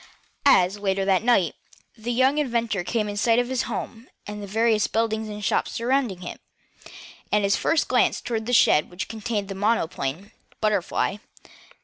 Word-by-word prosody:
As, 190 Hz, -5 st, +4 dB
later 195 Hz, -1 st, 0 dB
that 190 Hz, -1 st, +3 dB
night, 215 Hz, -8 st, +2 dB, 0.4 s
the 235 Hz, +1 st, -4 dB
young 260 Hz, +4 st, +3 dB
inventor 235 Hz, -8 st, -1 dB
came 215 Hz, +3 st, -1 dB
in 205 Hz, -, -4 dB
sight 225 Hz, +2 st, +2 dB
of 245 Hz, 0 st, +1 dB
his 260 Hz, -2 st, -1 dB
home, 230 Hz, +2 st, -6 dB, 0.2 s
and 210 Hz, 0 st, -7 dB
the 200 Hz, -, -7 dB
various 220 Hz, +1 st, +2 dB
buildings 220 Hz, -1 st, -1 dB
and 210 Hz, -1 st, -6 dB
shops -, -, 0 dB
surrounding 235 Hz, -6 st, -1 dB
it, 175 Hz, -, -8 dB, 0.9 s
his 200 Hz, -1 st, +3 dB
first 325 Hz, -2 st, +1 dB
glance 250 Hz, -, +3 dB
was -, -, -7 dB
toward 225 Hz, -2 st, -3 dB
the -, -, -1 dB
shed 155 Hz, -10 st, +4 dB
which 180 Hz, +1 st, -5 dB
contained 220 Hz, -2 st, -3 dB
his 195 Hz, -, -5 dB
monoplane, 190 Hz, -4 st, -1 dB, 0.3 s
BUTTERFLY. 205 Hz, -1 st, 0 dB
215 Hz, 165 wpm, -24 LUFS, 195-235 Hz, 0.9 s, As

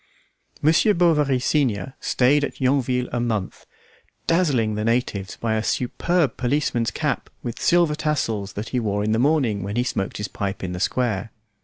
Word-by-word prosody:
Monsieur 165 Hz, +7 st, +4 dB
Bovary, 150 Hz, -6 st, +3 dB
senior, 130 Hz, -2 st, 0 dB
stayed 140 Hz, +3 st, +2 dB
at -, -, -4 dB
Yonville 130 Hz, -2 st, +1 dB
a 120 Hz, -, -1 dB
month, 110 Hz, -5 st, -3 dB, 0.6 s
dazzling 140 Hz, -11 st, +2 dB
the 105 Hz, 0 st, -2 dB
natives 115 Hz, -4 st, -1 dB
by 115 Hz, -1 st, -1 dB
a 110 Hz, -, +1 dB
superb 145 Hz, +5 st, 0 dB
policeman's 125 Hz, -3 st, 0 dB
cap -, -, -2 dB
with 120 Hz, -1 st, -5 dB
silver 170 Hz, -3 st, +3 dB
tassels 125 Hz, -10 st, -1 dB
that 105 Hz, +2 st, -5 dB
he 125 Hz, -, 0 dB
wore 105 Hz, -3 st, -1 dB
in 110 Hz, -, 0 dB
the 110 Hz, -, +2 dB
morning 130 Hz, -7 st, +2 dB
when 100 Hz, +3 st, -4 dB
he 120 Hz, -, +2 dB
smoked 100 Hz, -6 st, -2 dB
his 105 Hz, -, -3 dB
pipe 100 Hz, -1 st, -4 dB
in 90 Hz, -, -3 dB
the 90 Hz, -, -4 dB
square. 110 Hz, 0 st, 0 dB
125 Hz, 170 wpm, -23 LUFS, 105-145 Hz, 0.6 s, Monsieur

